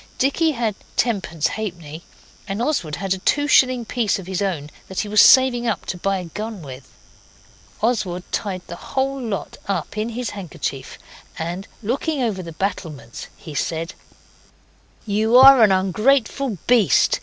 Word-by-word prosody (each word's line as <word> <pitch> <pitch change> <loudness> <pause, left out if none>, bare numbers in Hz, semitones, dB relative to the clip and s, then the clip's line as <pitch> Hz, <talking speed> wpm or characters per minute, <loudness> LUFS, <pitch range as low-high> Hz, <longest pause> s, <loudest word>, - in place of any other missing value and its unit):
Dicky 310 +4 +2
had 230 -4 -1 0.2
tenpence 190 -9 0
halfpenny, 170 -7 -4 0.5
and 195 +1 -3
Oswald 235 - -1
had 195 +1 -1
a 190 - -5
two 290 +9 +1
shilling 255 -4 +4
piece 225 -2 0
of 190 - -8
his 190 +1 -3
own 160 -7 -2 0.2
that 190 - -2
he - - -5
was 210 0 +5
saving 250 -2 +6
up 215 -5 -2
to - - -3
buy 195 +2 -1
a 180 - -5
gun 210 +2 -6
with. 130 -1 -10 0.9
Oswald 195 -7 0
tied 185 -4 -3
the - - -8
whole 270 0 -2
lot 220 -5 -4
up 200 +1 -3
in 220 +2 -1
his 235 0 -4
handkerchief, 160 -8 -6 0.4
and 175 +5 -4 0.2
looking 280 +7 -1
over 220 -7 -1
the 170 -2 -8
battlements, 160 - -5
he 155 - -10
said 165 +3 -2 1.1
'You 220 +3 +3
are 265 -1 +9
an 215 -3 +6
ungrateful 220 +5 +1
beast. 240 -5 +4
205 Hz, 155 wpm, -21 LUFS, 180-245 Hz, 1.1 s, are